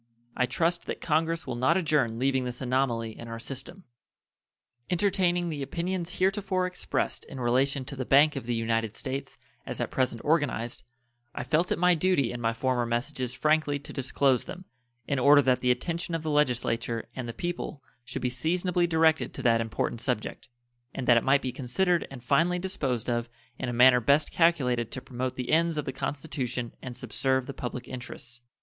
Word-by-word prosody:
I 125 - +2
trust 165 +7 0
that - - -3
Congress 165 +1 0
will 130 - -3
not 130 +8 +3
adjourn 150 -10 +1
leaving 130 +1 +1
this 125 -1 -5
anomaly 125 -3 0
in 115 - -8
our 115 0 -5
system. 135 +9 -5 1.1
Entertaining 175 -2 +1
the 150 -3 -4
opinions 175 +4 -3
heretofore 190 -1 +1
expressed 180 0 -2
in 135 - -9
relation 130 +3 +1
to 140 - -7
the 130 - -3
Bank 145 +4 +5
of 135 -4 -5
the 120 - 0
United 115 -1 -1
States 135 0 -5 0.3
as - - -6
at - - -2
present 130 -3 0
organized, 145 -7 0 0.5
I - - -3
felt 155 +8 +1
it - - +2
my 180 +1 +4
duty 170 -6 +2
in 120 - -5
my 115 -1 +2
former 120 +1 0
messages 125 +1 -2
frankly 150 0 +2
to 140 - -11
disclose 135 -1 +1
them, 185 +1 -8 0.4
in 140 -2 0
order 145 +2 +7
that 130 -1 +2
the 125 - +1
attention 165 +7 -1
of 165 - -3
the 155 - -1
Legislature 120 -5 0
and 125 -2 -4
the - - -1
people 170 +1 -4 0.2
should - - -5
be 125 - +1
seasonably 175 +6 +1
directed 160 -1 +2
to - - -5
that 115 -1 +4
important 115 0 -2
subject, 120 -1 -3 0.5
and 130 - -3
that 120 - +7
it 115 - +2
might 140 +1 +3
be 130 - -1
considered 170 +8 0
and 135 -3 -10
finally 165 +7 +3
disposed 145 - -2
of 120 -1 -1 0.3
in 130 - -2
a - - -1
manner 125 +1 +6
best 140 +6 +3
calculated 125 -9 +2
to - - -4
promote 130 0 -4
the 125 -2 -3
ends 165 0 +3
of 150 - -1
the 135 - -3
Constitution 130 -4 -3
and 125 -1 -7
subserve 130 0 0
the 140 - -6
public 125 -1 -5
interests. 125 -1 -7
135 Hz, 190 wpm, -28 LUFS, 125-160 Hz, 1.1 s, order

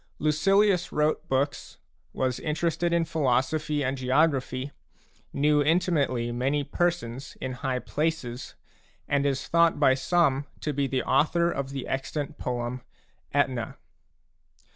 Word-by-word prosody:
Lucilius 180 +5 +2
wrote 150 +1 0
books, 135 +2 -1 0.3
was 130 -1 -1
interested 165 +2 -1
in 170 -1 +2
philosophy 150 +1 0
and 130 +1 -2
geography, 130 0 +1 0.6
knew 150 +1 +3
in 160 +4 +4
timately 140 -10 0
many 135 +4 0
persons 140 -4 -2
in 130 - -3
high 130 0 -2
places, 130 -2 -3 0.5
and 140 0 +1
is 140 0 -2
thought 170 -2 +3
by 135 -3 +5
some 140 0 +1
to 150 - -2
be 140 0 0
the 130 -1 -1
author 170 +2 +2
of 140 -4 -3
the 135 -2 -5
extant 135 +2 -3
poem 125 0 -3 0.5
Aetna. 130 -5 0
140 Hz, 125 wpm, -27 LUFS, 130-160 Hz, 0.6 s, by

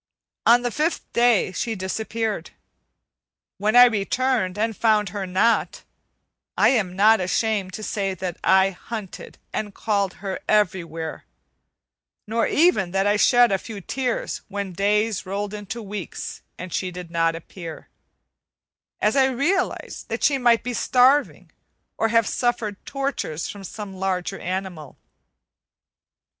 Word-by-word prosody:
On 240 +1 +6
the 245 - -1
fifth 310 +7 -1
day 235 -5 +3
she 225 +4 -2
disappeared. 220 +3 -3 1.1
When 215 +3 +1
I 245 0 +10
returned 220 -2 0
and 225 +1 0
found 215 -3 +2
her 195 0 -4
not, 205 +6 +1 0.7
I - - +5
am 195 -8 +1
not 215 +3 +5
ashamed 190 +1 0
to 215 - -6
say 195 -2 -2
that 180 -1 -5
I 190 0 +4
hunted 205 +1 -8 0.2
and 205 -2 -4
called 200 -3 0
her 195 -1 -5
everywhere, 170 -6 0 1.0
nor 225 +2 0
even 300 - +3
that 195 0 +2
I 205 0 +3
shed 245 +2 +5
a 195 - +1
few 215 0 -8
tears 250 +5 -3
when 200 -2 -4
days 205 +1 0
rolled 200 +2 -3
into 210 +2 -6
weeks 200 -3 -6 0.2
and 180 -1 -7
she 185 - -1
did 180 -1 -9
not 165 -1 +1
appear, 165 0 -9 1.1
as 210 - +2
I 265 -1 +5
realized 325 +9 -1
that - - -3
she 275 -2 +3
might 240 -2 +4
be 250 - -3
starving, 260 +4 +2 0.5
or 225 - +3
have 230 0 +3
suffered 235 -5 -1
tortures 275 - -3
from 200 -1 -8
some 200 +1 -7
larger 190 0 -2
animal. 180 -5 -5
210 Hz, 135 wpm, -23 LUFS, 190-230 Hz, 1.1 s, I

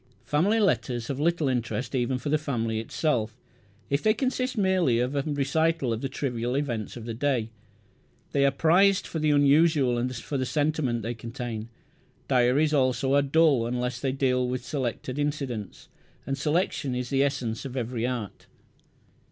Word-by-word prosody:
Family 190 +10 +2
letters 120 - 0
have 135 -1 -3
little 165 -1 +1
interest 125 0 -2
even 125 0 0
for 145 - -4
the 155 +1 +2
family 115 -7 -2
itself, 115 -2 -1 0.5
if 140 +1 0
they 215 0 +3
consist 255 -1 -1
merely 185 - +2
of 125 +4 -1
a 140 - +2
recital 145 -1 0
of 115 - -4
the 135 - -2
trivial 125 -3 -2
events 120 -7 -3
of 115 - -8
the 115 - -4
day. 120 -3 -1 0.8
They 140 - +2
are 140 - +5
prized 185 +7 +3
for 160 - -4
the 155 0 +1
unusual 145 -3 +4
and 125 +1 -2
for 135 +4 -4
the 130 - 0
sentiment 145 -6 0
they 115 +2 -2
contain. 115 -1 -6 0.6
Diaries 130 +4 +3
also 130 -1 +2
are 140 - +5
dull 140 -4 +3
unless 125 0 -2
they 135 0 -1
deal 130 -2 +1
with 125 0 -3
selected 130 0 -3
incidents; 140 -9 -3 0.4
and 135 - -1
selection 150 -2 0
is 125 -1 -4
the 135 0 +2
essence 125 -5 -2
of 135 -1 -6
every 120 -1 -2
art. 120 -6 -5
135 Hz, 170 wpm, -26 LUFS, 120-150 Hz, 0.8 s, are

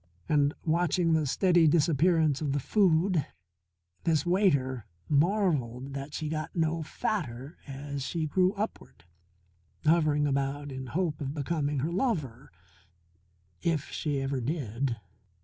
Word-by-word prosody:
And, 145 -1 +2
watching 170 +1 +2
the 155 -2 +2
steady 175 +2 +4
disappearance 160 -1 +3
of 145 -3 -1
the 145 - +1
food, 180 -1 +2 0.8
this 155 -3 +2
waiter 140 - +1 0.2
marvelled 145 - +1
that 140 +1 -6
she 155 - -3
got 155 0 -4
no 165 -1 +1
fatter 150 - -4
as 140 +1 -5
she 160 +4 -2
grew 185 +4 +2
upward, 210 - -5 0.8
hovering 155 -2 +3
about 140 +1 -1
in 130 0 -6
hope 160 +1 -1
of 140 +1 -3
becoming 145 -1 -1
her 155 +5 -1
lover 155 - -2 1.1
if 165 -4 -1
she 145 -3 -1
ever 135 -1 -2
did. 125 -3 -2
150 Hz, 125 wpm, -29 LUFS, 140-170 Hz, 1.1 s, steady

